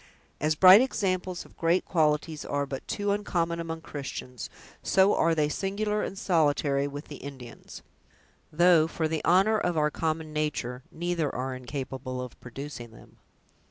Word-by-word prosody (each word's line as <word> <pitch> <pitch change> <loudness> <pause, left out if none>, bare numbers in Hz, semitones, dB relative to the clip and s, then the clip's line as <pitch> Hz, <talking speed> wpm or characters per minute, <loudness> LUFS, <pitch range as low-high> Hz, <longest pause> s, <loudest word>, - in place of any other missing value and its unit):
As 155 0 +1
bright 185 +6 +9
examples 185 -7 -1
of - - -19
great 170 +2 +1
qualities 155 -2 0
are 145 0 -1
but 135 -1 -7
too 205 -1 -1
uncommon 170 -5 -1
among 165 -1 -5
Christians, 135 -5 -7 0.3
so 195 +1 +4
are 165 0 +2
they 150 -2 +2
singular 210 +5 -1
and 195 - -4
solitary 145 -6 +1
with 145 +1 -7
the 145 - -8
Indians; 130 -4 -10 0.7
though, 170 0 +5
for 160 -1 -1
the 160 0 -3
honor 195 +5 +4
of 175 -4 -1
our 150 0 +2
common 160 -1 -2
nature, 140 -5 -2
neither 170 -2 -1
are 130 +1 -2
incapable 130 0 -5
of 125 -1 -8
producing 125 -1 -8
them. 110 - -17
155 Hz, 155 wpm, -28 LUFS, 140-175 Hz, 0.7 s, bright